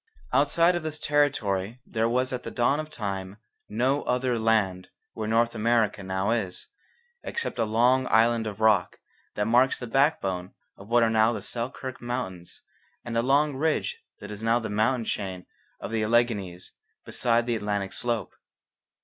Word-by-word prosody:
Outside 165 Hz, +5 st, +4 dB
of 175 Hz, -, -1 dB
this 155 Hz, -1 st, -3 dB
territory 120 Hz, -9 st, 0 dB
there 115 Hz, 0 st, 0 dB
was 130 Hz, +2 st, +1 dB
at 125 Hz, -, -3 dB
the -, -, -6 dB
dawn 130 Hz, +5 st, +1 dB
of 155 Hz, 0 st, -5 dB
time 100 Hz, -6 st, -5 dB, 0.3 s
no 130 Hz, +6 st, +1 dB
other 125 Hz, -1 st, 0 dB
'land' 105 Hz, -5 st, +1 dB, 0.2 s
where 110 Hz, -1 st, -4 dB
North 115 Hz, +1 st, +2 dB
America 115 Hz, -2 st, +1 dB
now 95 Hz, +2 st, -1 dB
is, 105 Hz, -6 st, -3 dB, 0.5 s
except 465 Hz, -, -4 dB
a 115 Hz, -, +3 dB
long 125 Hz, +4 st, +3 dB
island 115 Hz, 0 st, +3 dB
of 105 Hz, 0 st, -6 dB
rock 110 Hz, -4 st, +3 dB, 0.4 s
that 105 Hz, -, 0 dB
marks 125 Hz, +4 st, +3 dB
the 125 Hz, -, -6 dB
backbone 105 Hz, -, 0 dB, 0.2 s
of 95 Hz, -, -13 dB
what 120 Hz, +1 st, +4 dB
are 115 Hz, -, +2 dB
now 110 Hz, +1 st, +4 dB
the -, -, -5 dB
Selkirk 130 Hz, +2 st, -5 dB
Mountains 120 Hz, -8 st, -5 dB, 0.4 s
and 120 Hz, -1 st, -4 dB
a 115 Hz, -, +3 dB
long 140 Hz, +3 st, +2 dB
ridge 155 Hz, +3 st, -1 dB, 0.2 s
that 105 Hz, +1 st, -9 dB
is 105 Hz, 0 st, -7 dB
now 115 Hz, +1 st, +3 dB
the 110 Hz, -3 st, -4 dB
mountain 110 Hz, +3 st, +1 dB
chain 95 Hz, -4 st, -4 dB, 0.3 s
of -, -, -6 dB
the 110 Hz, -1 st, 0 dB
Alleghanies 105 Hz, -6 st, 0 dB, 0.3 s
beside 120 Hz, -1 st, +1 dB
the 120 Hz, -1 st, 0 dB
Atlantic 105 Hz, -2 st, -2 dB
slope. 115 Hz, -7 st, -2 dB
115 Hz, 165 wpm, -26 LUFS, 105-125 Hz, 0.5 s, Outside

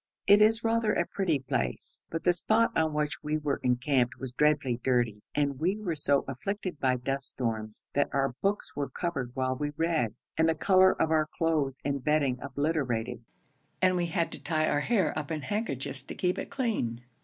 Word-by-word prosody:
It 205 Hz, +1 st, +7 dB
is 220 Hz, +1 st, +4 dB
rather 225 Hz, -1 st, +2 dB
a 175 Hz, -, +1 dB
pretty 175 Hz, -6 st, 0 dB
place, 65 Hz, -, -2 dB
but 165 Hz, -, -4 dB
the 175 Hz, -, +4 dB
spot 220 Hz, +6 st, +2 dB
on 160 Hz, -1 st, +2 dB
which 150 Hz, -1 st, -2 dB
we 150 Hz, +1 st, -1 dB
were 145 Hz, -2 st, -1 dB
encamped 125 Hz, -1 st, +1 dB
was 130 Hz, -2 st, -5 dB
dreadfully 145 Hz, -3 st, +2 dB
dirty, 120 Hz, -4 st, 0 dB
and 140 Hz, -2 st, 0 dB
we 185 Hz, +6 st, +1 dB
were 200 Hz, -6 st, -2 dB
so 145 Hz, -2 st, +2 dB
afflicted 185 Hz, +6 st, -4 dB
by 130 Hz, -1 st, +2 dB
dust 135 Hz, +2 st, -3 dB
storms, 110 Hz, -3 st, -3 dB
that 145 Hz, -, +2 dB
our 135 Hz, -2 st, +1 dB
books 200 Hz, +1 st, -1 dB
were 145 Hz, -1 st, -2 dB
covered 135 Hz, -9 st, -3 dB
while 130 Hz, 0 st, 0 dB
we 145 Hz, +2 st, -3 dB
read, 160 Hz, -10 st, 0 dB, 0.2 s
and 160 Hz, 0 st, +4 dB
the 160 Hz, -, +2 dB
colour 185 Hz, +2 st, +4 dB
of 160 Hz, -, +2 dB
our 155 Hz, -1 st, +3 dB
clothes 155 Hz, -4 st, 0 dB
and 140 Hz, -2 st, -1 dB
bedding 140 Hz, -4 st, +2 dB
obliterated, 135 Hz, -5 st, -2 dB, 0.6 s
and 185 Hz, 0 st, +3 dB
we 175 Hz, -1 st, 0 dB
had 170 Hz, 0 st, -1 dB
to -, -, -7 dB
tie 155 Hz, -2 st, 0 dB
our 145 Hz, -, +2 dB
hair 190 Hz, 0 st, +1 dB
up 150 Hz, -2 st, -3 dB
in 155 Hz, -2 st, -2 dB
handkerchiefs 140 Hz, -, -3 dB
to 135 Hz, -, -8 dB
keep 180 Hz, 0 st, 0 dB
it -, -, -5 dB
clean. 215 Hz, -, -2 dB
150 Hz, 195 wpm, -29 LUFS, 130-175 Hz, 0.6 s, It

